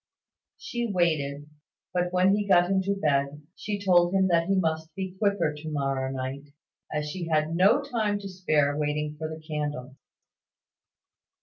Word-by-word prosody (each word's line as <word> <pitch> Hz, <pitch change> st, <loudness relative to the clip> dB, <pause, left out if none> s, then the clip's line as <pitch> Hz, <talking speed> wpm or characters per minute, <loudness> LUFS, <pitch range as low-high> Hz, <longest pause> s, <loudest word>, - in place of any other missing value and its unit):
She 240 Hz, -1 st, -3 dB
waited; 150 Hz, -5 st, 0 dB, 0.5 s
but 180 Hz, 0 st, 0 dB
when 185 Hz, +2 st, +4 dB
he 205 Hz, -1 st, -2 dB
got 175 Hz, -1 st, +4 dB
into 195 Hz, +1 st, +1 dB
bed, 145 Hz, -4 st, 0 dB
she 205 Hz, -1 st, -4 dB
told 180 Hz, -2 st, +3 dB
him 190 Hz, -1 st, +3 dB
that 170 Hz, -1 st, +2 dB
he 195 Hz, -, +2 dB
must 160 Hz, -3 st, -1 dB
be 190 Hz, -1 st, -5 dB
quicker 200 Hz, -7 st, +1 dB
to 150 Hz, +1 st, -7 dB
morrow 135 Hz, -2 st, -1 dB
night, 135 Hz, +2 st, -5 dB, 0.4 s
as 150 Hz, -1 st, -2 dB
she 170 Hz, +2 st, -5 dB
had 155 Hz, 0 st, +1 dB
no 200 Hz, +11 st, +4 dB
time 220 Hz, -7 st, -1 dB
to 200 Hz, -, -6 dB
spare 155 Hz, -6 st, +1 dB
waiting 150 Hz, 0 st, -2 dB
for 155 Hz, 0 st, -3 dB
the 160 Hz, 0 st, -7 dB
candle. 145 Hz, -4 st, -5 dB
165 Hz, 160 wpm, -27 LUFS, 150-190 Hz, 0.5 s, when